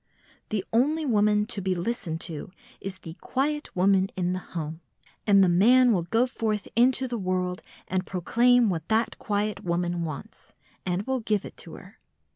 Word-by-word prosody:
The 205 -3 -2
only 300 +7 +2
woman 210 -4 +3
to 210 -2 -3
be 185 0 0
listened 175 -4 -3
to 160 -2 -5 0.3
is 190 -1 -6
"the 165 -3 -9
quiet 295 +3 -2
woman 190 +1 +3
in 180 -1 0
the 185 - -2
home," 160 -2 -6 0.5
and 200 -1 +6 0.2
man 250 +4 +6
will 190 -6 +2
go 225 +9 +2
forth 220 -5 -2
into 255 +2 +3
the 240 -2 -3
world 185 -1 -1 0.3
and 185 0 -1
proclaim 235 +5 +3
what 165 -2 -4
that 225 +1 0
quiet 210 0 -2
woman 175 0 -1
wants, 155 -4 -8 0.3
and 180 +2 0
will 265 -1 0
give 215 -3 -1
it - - -10
to - - -10
her. - - -14
200 Hz, 170 wpm, -26 LUFS, 180-235 Hz, 0.5 s, and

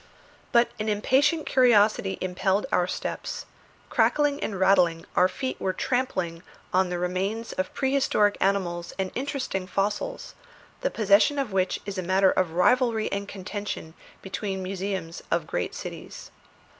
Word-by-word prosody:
But 235 0 +4
an 215 +1 -1
impatient 270 +9 +2
curiosity 215 -6 +4
impelled 190 +3 0
our 180 - +2
steps; - - -4 0.5
crackling 290 -1 +2
and 195 -3 -3
rattling, 180 -4 +3
our 180 - +5
feet 260 +8 -4
were 190 - 0
trampling 185 -9 -1 0.3
on 185 0 +3
the 180 - -2
remains 190 +6 -2
of 185 0 -2
prehistoric 265 -6 +2
animals 180 -3 0
and 190 -1 -2
interesting 255 -8 -3
fossils, 210 - -2 0.5
the - - 0
possession 215 +7 +3
of 270 -6 -1
which 185 -1 +1
is 200 -2 -4
a - - 0
matter 190 +2 +3
of 175 -3 0
rivalry 230 +4 +2
and 200 0 -3
contention 200 -4 -6 0.3
between 195 0 -3
the 185 - -5
museums 190 -3 -4
of 170 -2 0
great 90 -11 -3
cities. - - -8
195 Hz, 145 wpm, -26 LUFS, 185-230 Hz, 0.5 s, our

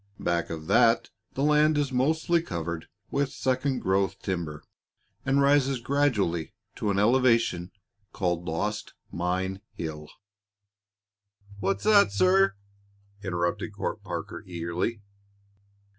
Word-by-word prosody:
Back 85 -1 0
of 80 -1 -6
that, 115 +6 +4 0.2
the 135 - -1
land 150 +1 +4
is 145 -2 0
mostly 160 +6 +2
covered 85 - -4 0.2
with 140 -1 0
second 130 +1 0
growth 95 +1 +1
timber, 85 -5 -3 0.6
and 140 +1 +3
rises 140 -2 +3
gradually 115 - 0 0.2
to 105 - -1
an 100 - +1
elevation 115 -5 +3 0.4
called 85 -2 -1
Lost 105 +6 -3 0.2
Mine 95 +2 -2
Hill 75 -2 -6 0.8
" 100 0 -25
"What's 95 +1 -1
that, 205 - +5
sir?" 95 0 +4 0.7
interrupted 95 +2 -2
Court 100 +1 -3
Parker, 90 +1 -5
eagerly. 90 +5 -3
100 Hz, 115 wpm, -27 LUFS, 90-130 Hz, 0.8 s, that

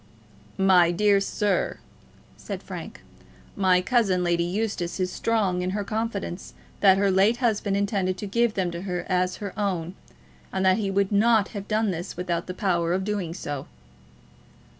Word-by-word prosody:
"My 185 -3 +5
dear 200 +3 +3
sir," 200 -1 0 0.6
said - - -7
Frank, - - -8 0.5
"my 185 -2 +3
cousin, 195 -6 +2
Lady 170 -1 +1
Eustace, 190 -1 -2
is 180 -1 0
strong 200 -6 0
in 180 - -1
her 205 - -1
confidence 215 -4 -4 0.2
that 195 -2 +6
her 200 0 +2
late 195 +5 +3
husband 215 -5 0
intended 195 -2 0
to 205 - -5
give 235 +2 +1
them 185 -3 0
to 170 0 -6
her 180 -2 -3
as 180 -1 +1
her 200 -3 -6
own, 185 -5 -2 0.6
and 190 0 -1
that 185 0 +5
he 200 -2 -1
would 195 +1 +1
not 215 0 +3
have 200 -2 -7
done 215 -1 +1
this 175 0 -6
without 175 -1 -2
the 180 - -5
power 175 -4 0
of 190 +1 0
doing 190 -5 -3
so." 145 -6 -5
190 Hz, 165 wpm, -25 LUFS, 180-205 Hz, 0.6 s, that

